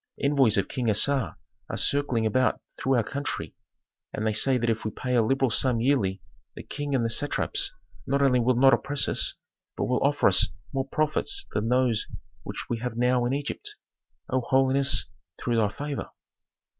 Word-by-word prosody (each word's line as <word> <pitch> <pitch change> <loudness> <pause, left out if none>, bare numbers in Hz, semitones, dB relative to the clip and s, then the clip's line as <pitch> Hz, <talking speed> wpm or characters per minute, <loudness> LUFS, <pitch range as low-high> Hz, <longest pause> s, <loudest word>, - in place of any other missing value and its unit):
Envoys 140 -6 +3
of - - +1
King 125 -3 -2
Assar 115 - +2 0.3
are - - -4
circling 135 -6 +1
about 130 +3 +1 0.2
through 135 0 0
our 120 - +2
country 140 +6 -5 0.6
and 110 - -4
they 110 - +1
say 130 +5 +4
that 120 -1 -1
if 115 -1 -1
we 110 - -2
pay 125 +4 -4
a 120 - +4
liberal 135 +2 +1
sum 125 0 +1
yearly 105 -7 0 0.3
the - - -8
King 145 -1 -4
and 120 -3 +1
the - - 0
satraps 395 - 0 0.4
not 140 +1 +1
only 135 -3 +3
will 125 +1 +2
not 135 +2 +5
oppress 140 +4 +1
us, - - +2 0.4
but - - -1
will - - 0
offer - - +3
us - - +5 0.3
more 135 0 -2
profits 155 - -1
than 110 +2 -1
those 125 -3 +1 0.3
which - - -6
we 115 - -3
have 120 -1 -5
now 125 0 +2
in 125 - 0
Egypt, 280 - -4 0.6
O 130 0 +1
holiness, 135 +2 +2 0.3
through 120 -2 -1
thy 110 -2 +3
favor." 145 +6 -5
130 Hz, 180 wpm, -26 LUFS, 115-140 Hz, 0.6 s, not